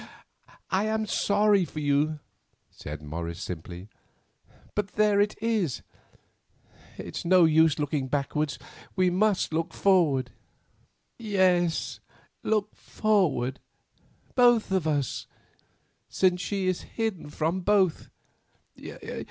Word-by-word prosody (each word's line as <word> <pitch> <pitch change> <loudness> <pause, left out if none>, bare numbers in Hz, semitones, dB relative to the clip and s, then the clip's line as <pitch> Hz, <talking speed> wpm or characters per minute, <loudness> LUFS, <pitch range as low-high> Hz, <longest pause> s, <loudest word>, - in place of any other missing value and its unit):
"I 190 +3 +2
am 220 0 0
sorry 205 -1 +2
for 155 -2 -6
you," 150 +1 +1 0.5
said 75 +1 -8
Morris 85 +3 -5
simply, 90 +2 -7 0.9
"but 205 -2 -3
there 210 -1 +3
it 205 +1 0
is. 215 - -1 1.1
It - - -7
is - - -4
no 180 0 +5
use 160 -1 +4
looking 145 -2 -1
backward, 145 +2 -1 0.4
we 185 -1 +3
must 195 -2 +1
look 165 +1 -2
forward." 150 -10 +2 0.9
"Yes, 185 -6 +1 0.4
look 215 -1 0
forward, 160 - 0 0.7
both 240 -5 +4
of 185 -4 +1
us, 145 -5 -1 0.8
since 180 -1 +2
she 195 0 -2
is 185 -1 0 0.2
hidden 220 -9 -2
from 160 +5 -1
both. 190 -3 +2
180 Hz, 105 wpm, -27 LUFS, 145-205 Hz, 1.1 s, no